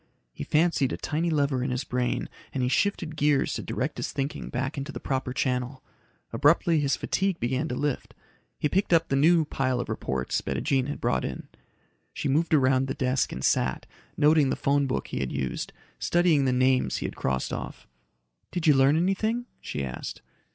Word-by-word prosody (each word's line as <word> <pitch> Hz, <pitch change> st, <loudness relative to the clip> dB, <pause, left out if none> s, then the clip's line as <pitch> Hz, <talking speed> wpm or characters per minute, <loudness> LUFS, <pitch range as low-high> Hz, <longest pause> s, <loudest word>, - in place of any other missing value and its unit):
He -, -, -6 dB
fancied 155 Hz, -4 st, +2 dB
a -, -, -3 dB
tiny 160 Hz, +3 st, -1 dB
lever 140 Hz, -5 st, +1 dB
in 135 Hz, -, -1 dB
his 125 Hz, +1 st, -1 dB
brain 125 Hz, -1 st, -1 dB, 0.2 s
and 130 Hz, -, -2 dB
he 125 Hz, -, +1 dB
shifted 170 Hz, -1 st, 0 dB
gears 145 Hz, -2 st, +2 dB
to -, -, -3 dB
direct -, -, -3 dB
his -, -, -3 dB
thinking 140 Hz, +1 st, -3 dB
back 130 Hz, +4 st, -2 dB
into 140 Hz, +1 st, -4 dB
the -, -, -6 dB
proper 130 Hz, -1 st, -2 dB
channel. 130 Hz, 0 st, -2 dB, 0.5 s
Abruptly 150 Hz, +5 st, +4 dB
his 140 Hz, -3 st, +1 dB
fatigue 190 Hz, +6 st, -1 dB
began 130 Hz, +2 st, -1 dB
to 125 Hz, -, -3 dB
lift. 145 Hz, 0 st, -2 dB, 0.4 s
He -, -, +1 dB
picked 190 Hz, +4 st, +1 dB
up 165 Hz, 0 st, +3 dB
the 135 Hz, -, +1 dB
new 160 Hz, +3 st, +4 dB
pile 130 Hz, -3 st, -1 dB
of 120 Hz, -, -4 dB
reports 65 Hz, -1 st, -2 dB
Bettijean 135 Hz, -1 st, 0 dB
had 145 Hz, -, -4 dB
brought -, -, +1 dB
in. -, -, -5 dB, 0.6 s
She -, -, -3 dB
move 155 Hz, +5 st, +2 dB
around 135 Hz, -3 st, +3 dB
the 135 Hz, -, -3 dB
desk 130 Hz, 0 st, 0 dB
and 65 Hz, -, -6 dB
sat, 65 Hz, -, +1 dB, 0.3 s
noting 150 Hz, -2 st, +4 dB
the -, -, 0 dB
phone 140 Hz, 0 st, +1 dB
book 130 Hz, -, -2 dB
he -, -, -3 dB
had 65 Hz, -2 st, -2 dB
used, 65 Hz, -2 st, -3 dB, 0.3 s
studying 170 Hz, -5 st, +3 dB
the 130 Hz, -, +2 dB
names 130 Hz, 0 st, +2 dB
he -, -, -4 dB
had -, -, -4 dB
crossed 65 Hz, -1 st, -2 dB
off. -, -, -6 dB, 0.6 s
"Did 175 Hz, -2 st, -3 dB
you 155 Hz, -, +7 dB
learn 135 Hz, +3 st, +4 dB
anything?" 215 Hz, +7 st, 0 dB
she 70 Hz, -, -4 dB
asked. 65 Hz, -1 st, -7 dB
140 Hz, 195 wpm, -27 LUFS, 130-155 Hz, 0.6 s, you